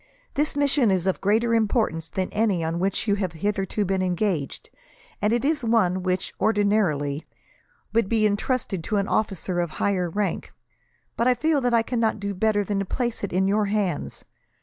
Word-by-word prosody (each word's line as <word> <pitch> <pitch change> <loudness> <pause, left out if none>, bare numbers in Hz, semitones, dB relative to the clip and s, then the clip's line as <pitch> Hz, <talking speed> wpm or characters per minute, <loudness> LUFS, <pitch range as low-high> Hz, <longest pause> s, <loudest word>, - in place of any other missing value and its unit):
This 295 +1 0
mission 280 -4 +2
is 185 -2 +1
of 190 - 0
greater 225 +4 +2
importance 215 - +1
than 185 +2 -3
any 210 -6 +1
on 165 +1 -2
which 195 +4 -1
you 205 - +3
have 185 -4 -2
hitherto 200 +3 -1
been 190 0 0
engaged, 180 -5 -2 0.5
and 210 +1 +2
is 275 +5 +1
one 215 -6 +2
which, 185 0 -2
ordinarily, 195 -9 +1 0.7
would 225 -3 +2
be 220 -2 +2
entrusted 205 -3 -1
to 215 - 0
an 200 0 0
officer 190 -3 -1
of 175 -1 0
higher 185 -3 0
rank; 205 +4 -2 0.6
but 235 - +1
I 250 - +4
feel 310 +1 +1
that 245 -1 +2
I 230 - +4
cannot 225 -2 0
do 200 0 -3
better 205 +1 +1
than 200 0 -1
place 240 0 -2
it 200 - -2
in 190 +2 +2
your 210 +2 +2
hands. 205 -3 -2
205 Hz, 175 wpm, -24 LUFS, 185-225 Hz, 0.7 s, I